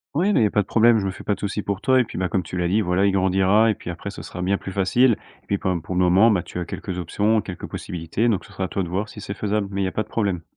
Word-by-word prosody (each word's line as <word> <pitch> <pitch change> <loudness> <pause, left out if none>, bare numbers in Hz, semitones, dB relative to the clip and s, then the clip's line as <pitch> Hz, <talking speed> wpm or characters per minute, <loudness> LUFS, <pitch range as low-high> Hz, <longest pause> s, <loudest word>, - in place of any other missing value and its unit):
Oui, 185 +7 +2
mais 165 - +3
il - - +5
y - - +5
a 105 - +1
pas 105 - +3
de 100 - -7
problème, 115 0 +5
je 95 - -2
me 95 - -1
fais - - -11
pas 105 - 0
de - - -7
souci 105 0 -3
pour 100 0 -3
toi 130 +2 +4
et - - +4
puis, 110 - -7
bah, 90 -1 0
comme 90 +2 0
tu 90 - -8
l'as 90 -1 0
dit, 100 +5 +2
voilà, 95 +1 +2
il 100 - +3
grandira 95 +3 +3
et - - +1
puis 90 - -9
après, 90 +4 -6
ce - - -9
sera 90 - -6
bien 100 +2 +1
plus 95 - -7
facile. 115 +7 +3 0.3
Et - - -34
puis, 100 - 0
quand 95 - -2
même, 85 -2 -2
pour 90 +3 -5
le 90 - +2
moment, 95 +5 +5
bah, 95 -6 +2
tu - - -7
as 90 - -3
quelques 90 +2 -5
options, 105 +6 +1
quelques 90 -4 -7
possibilités, 90 +7 -2
donc 105 -5 -1
ce - - -16
sera 95 0 -2
à - - -3
toi 95 - -2
de 85 - -5
voir 100 +4 -2
si 105 - -10
c'est 100 - -5
faisable, 105 -1 -1
mais 100 0 -2
il - - +1
y - - 0
a - - -3
pas 110 - -1
de - - -22
problème. 100 -6 -1
100 Hz, 370 wpm, -23 LUFS, 90-105 Hz, 0.3 s, il